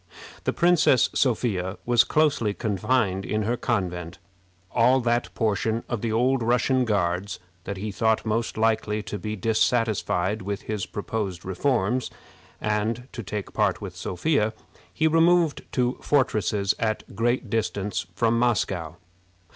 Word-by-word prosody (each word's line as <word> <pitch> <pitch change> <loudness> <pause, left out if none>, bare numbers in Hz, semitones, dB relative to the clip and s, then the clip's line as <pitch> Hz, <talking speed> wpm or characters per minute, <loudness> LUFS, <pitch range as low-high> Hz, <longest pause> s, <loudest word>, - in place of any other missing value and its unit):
The - - +2
Princess 170 -8 +4
Sophia 105 -7 0
was 120 -1 +5
closely 145 -9 +1
confined 105 -2 0
in 110 +1 -1
her 115 +3 0
convent. 90 -8 -2 0.5
All 125 +2 +4
that 120 0 0
portion 110 +1 0
of 120 -4 -3
the 115 - -1
old 125 +3 +2
Russian 125 +2 +2
Guards 95 -2 0 0.3
that 100 - -4
he 105 +2 -4
thought 110 +2 +1
most 110 +1 -1
likely 110 -1 +1
to 105 - -5
be 105 +4 -4
dissatisfied 110 -2 +1
with 100 0 -4
his 105 -3 -3
proposed 100 -4 -4
reforms, 120 +4 0 0.5
and 110 +4 -1
to 120 - -6
take 105 -1 -5
part 105 -3 +1
with 95 -4 -7
Sophia, 110 - 0 0.4
he 160 - 0
removed 165 0 +3
to 125 0 0
fortresses 110 -8 +1
at 110 -1 -1
a - - -14
great 120 +1 0
distance 105 -5 -1
from 115 +2 +2
Moscow. 95 -9 0
110 Hz, 140 wpm, -25 LUFS, 100-120 Hz, 0.5 s, was